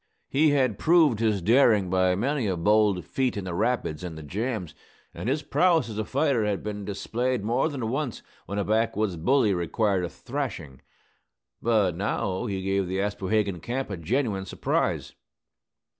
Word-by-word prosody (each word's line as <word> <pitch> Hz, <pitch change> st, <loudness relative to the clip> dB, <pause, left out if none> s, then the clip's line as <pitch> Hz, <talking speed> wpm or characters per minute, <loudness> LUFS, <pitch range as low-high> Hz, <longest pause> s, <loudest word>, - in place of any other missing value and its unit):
He 150 Hz, +3 st, +4 dB
had 130 Hz, -7 st, +1 dB
proved 155 Hz, -9 st, +4 dB
his 105 Hz, -5 st, +1 dB
daring 110 Hz, -4 st, +4 dB
by 95 Hz, -1 st, +3 dB
many 130 Hz, +3 st, 0 dB
a 95 Hz, -2 st, -1 dB
bold 100 Hz, -1 st, +2 dB
feat 130 Hz, +1 st, -1 dB
in 100 Hz, -, -3 dB
the 90 Hz, -2 st, -4 dB
rapids 90 Hz, -6 st, -1 dB
and 85 Hz, -3 st, -6 dB
the 80 Hz, -, -8 dB
jams; 105 Hz, -, -3 dB, 0.4 s
and 115 Hz, -, -4 dB
his 145 Hz, +3 st, 0 dB
prowess 165 Hz, -8 st, +2 dB
as 110 Hz, -1 st, -5 dB
a -, -, 0 dB
fighter 135 Hz, -3 st, +1 dB
had 105 Hz, -2 st, -1 dB
been 105 Hz, -1 st, -4 dB
displayed 120 Hz, +4 st, -2 dB
more 120 Hz, +8 st, +1 dB
than 130 Hz, -7 st, -4 dB
once 135 Hz, 0 st, -3 dB, 0.2 s
when 100 Hz, +3 st, -4 dB
a 100 Hz, -, +1 dB
backwoods 110 Hz, -2 st, 0 dB
bully 110 Hz, -, +2 dB
required 95 Hz, +2 st, 0 dB
a 90 Hz, -, -2 dB
thrashing. 100 Hz, -, -5 dB, 0.8 s
But 105 Hz, -7 st, +2 dB
now 95 Hz, +2 st, -2 dB
he 95 Hz, -2 st, -3 dB
gave 95 Hz, 0 st, 0 dB
the 95 Hz, +1 st, -2 dB
Aspohegan 100 Hz, -1 st, -1 dB
camp 125 Hz, +5 st, -4 dB
a -, -, -2 dB
genuine 95 Hz, -, -1 dB
surprise. -, -, -1 dB
105 Hz, 170 wpm, -26 LUFS, 95-125 Hz, 0.8 s, He